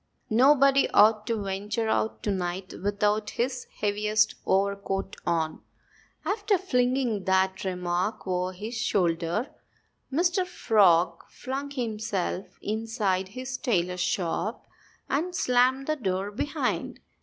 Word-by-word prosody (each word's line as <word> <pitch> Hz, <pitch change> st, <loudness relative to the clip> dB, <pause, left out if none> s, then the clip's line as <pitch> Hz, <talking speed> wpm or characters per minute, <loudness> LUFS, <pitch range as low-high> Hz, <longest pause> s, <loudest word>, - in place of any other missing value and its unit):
Nobody 275 Hz, +3 st, +5 dB
ought 215 Hz, 0 st, +5 dB
to 225 Hz, -3 st, -1 dB
venture 205 Hz, +3 st, -2 dB
out 220 Hz, 0 st, 0 dB
to 205 Hz, -, 0 dB
night 185 Hz, 0 st, -3 dB
without 205 Hz, +1 st, +1 dB
his 250 Hz, +1 st, -1 dB, 0.2 s
heaviest 210 Hz, +1 st, +2 dB
overcoat 195 Hz, 0 st, 0 dB
on." 160 Hz, -2 st, 0 dB, 0.6 s
After 410 Hz, -1 st, +1 dB
flinging 250 Hz, -, 0 dB
that 190 Hz, 0 st, +2 dB
remark 180 Hz, +2 st, -2 dB
over 180 Hz, -1 st, -1 dB
his 210 Hz, +6 st, -6 dB
shoulder, 185 Hz, -, 0 dB, 0.6 s
Mr. 350 Hz, +5 st, +2 dB
Frog 205 Hz, -, +3 dB
flung 270 Hz, +3 st, -5 dB
himself 220 Hz, -7 st, -2 dB, 0.2 s
inside 215 Hz, -4 st, -1 dB
his 255 Hz, 0 st, -4 dB
tailor's 180 Hz, -, 0 dB
shop 185 Hz, +6 st, -1 dB, 0.4 s
and 345 Hz, +6 st, -1 dB
slammed 255 Hz, -1 st, +3 dB
the 310 Hz, +1 st, -1 dB
door 195 Hz, -4 st, -2 dB
behind 250 Hz, +8 st, -2 dB
him. -, -, -34 dB
210 Hz, 115 wpm, -27 LUFS, 190-255 Hz, 0.6 s, Nobody